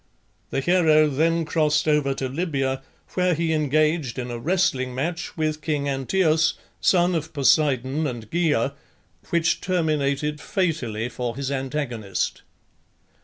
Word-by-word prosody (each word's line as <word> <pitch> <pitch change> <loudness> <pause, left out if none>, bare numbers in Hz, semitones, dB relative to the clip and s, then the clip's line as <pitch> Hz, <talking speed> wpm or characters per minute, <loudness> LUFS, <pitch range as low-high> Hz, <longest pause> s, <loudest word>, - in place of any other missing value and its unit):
The 135 - -1
hero 155 -2 +4
then 165 +3 +1
crossed 155 -1 +1
over 150 -3 +2
to 135 - -2
Libya, 135 -3 -1 0.3
where 180 -2 +2
he 165 0 0
engaged 155 -2 +1
in 125 -1 -4
a 120 - -4
wrestling 145 -5 0
match 165 +7 -3
with 155 -1 -1
king 150 -2 -1
Anteos, 155 +4 +2 0.2
son 180 -1 +3
of 160 -1 -3
Poseidon 140 0 +2
and 120 -5 -6
Gaea, 150 -6 +1 0.6
which 170 -1 +1
terminated 150 -4 0
fatally 130 - -1
for 125 -1 -4
his 140 0 -3
antagonist. 130 -7 -2
150 Hz, 125 wpm, -24 LUFS, 135-165 Hz, 0.6 s, hero